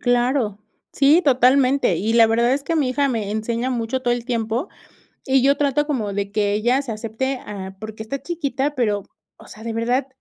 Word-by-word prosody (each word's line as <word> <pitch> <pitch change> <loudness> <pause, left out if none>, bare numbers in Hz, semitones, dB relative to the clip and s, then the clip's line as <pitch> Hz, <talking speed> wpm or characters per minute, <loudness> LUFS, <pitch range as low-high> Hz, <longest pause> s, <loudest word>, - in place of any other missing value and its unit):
Claro, 245 -3 +1 0.3
sí, 295 +6 +4
totalmente, 255 - +3
y 220 +5 -1
la 230 -1 +6
verdad 235 +2 +2
es 275 +1 0
que 330 +3 -1
mi 280 -5 +1
hija 280 +2 +1
me 220 -5 -2
enseña 230 +4 -2
mucho 245 +2 -2
todo 240 -1 +1
el 240 -1 -3
tiempo, 235 - -2 0.6
y 265 -2 +3
yo 280 +1 +4
trato 290 0 +1
como 230 -9 -2
de 200 0 -3
que 205 -1 +1
ella 240 +6 +2
se 270 -4 -6
acepte 230 +5 -3
a 190 -2 -7
porque 220 +1 -8
está 270 +5 -5
chiquita, 290 -3 -2
pero, 210 -6 0 0.3
o - - -16
sea, 215 - -12
de 230 -1 -4
verdad, 245 +4 0
245 Hz, 200 wpm, -21 LUFS, 220-270 Hz, 0.6 s, la